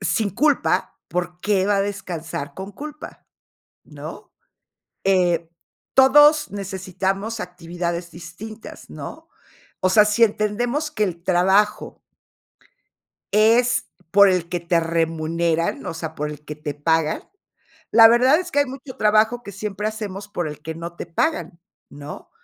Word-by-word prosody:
sin 205 +2 0
culpa, 295 - +1
¿por 180 0 -3
qué 195 -2 +1
va 205 0 +2
a - - +2
descansar 165 -7 -5
con 190 +4 -7
culpa, 300 +7 -9 0.6
no? - - -10 0.7
Eh, 175 -3 +2 0.4
todos 295 +3 +6
necesitamos 195 +2 -3
actividades 175 -1 -5
distintas, 190 +7 -10
¿no? - - -9 0.5
O 185 - +2
sea, 210 +2 +6
si 210 +2 +3
entendemos 235 +8 0
que 215 -8 0
el 170 -3 -3
trabajo 190 +3 +2 1.3
es 235 +4 +3 0.2
por 200 +1 +7
el 180 -3 0
que 175 0 -2
te 170 0 +1
remuneran, 165 0 -1
o - - -4
sea, 160 -1 -6
por 150 -1 -3
el 150 0 -10
que 150 - -6
te 150 -1 -5
pagan, 160 +1 0 0.7
la 225 0 +9
verdad 250 +6 +5
es 360 0 -5
que 285 - +3
hay 285 - +2
mucho 265 0 -9
trabajo 215 +3 +3
que 200 - -8
siempre 205 +1 -3
hacemos 205 -2 -6
por 175 -5 -3
el 150 0 -7
que 160 0 -5
no 170 +1 -7
te - - -6
pagan, 180 - -2 0.3
¿no?, 145 +1 -10
190 Hz, 140 wpm, -22 LUFS, 170-220 Hz, 1.3 s, la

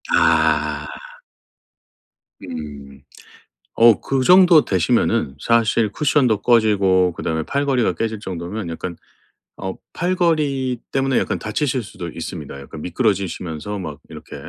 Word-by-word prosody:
아. 75 -1 +2 1.6
음. 70 -3 -8 0.7
어 115 -2 +6
그 135 -1 -1
정도 180 -1 +6
되시면은 80 -6 +1
사실 115 0 +2
쿠션도 135 -8 +1
꺼지고 100 -6 +3
그다음에 80 -1 -3
팔걸이가 135 - 0
깨질 110 +3 -3
정도면 95 0 -5
약간 85 +1 -6 0.6
어 95 -1 -4 0.2
팔걸이 155 -8 0
때문에 135 -1 +1
약간 - - -2
다치실 125 +2 -2
수도 95 -4 -8
있습니다. 80 -4 -7
약간 75 +2 -10
미끄러지시면서 95 -2 -2
막 80 -6 -7
이렇게 - - -10
100 Hz, 265 characters per minute, -20 LUFS, 80-130 Hz, 1.6 s, 어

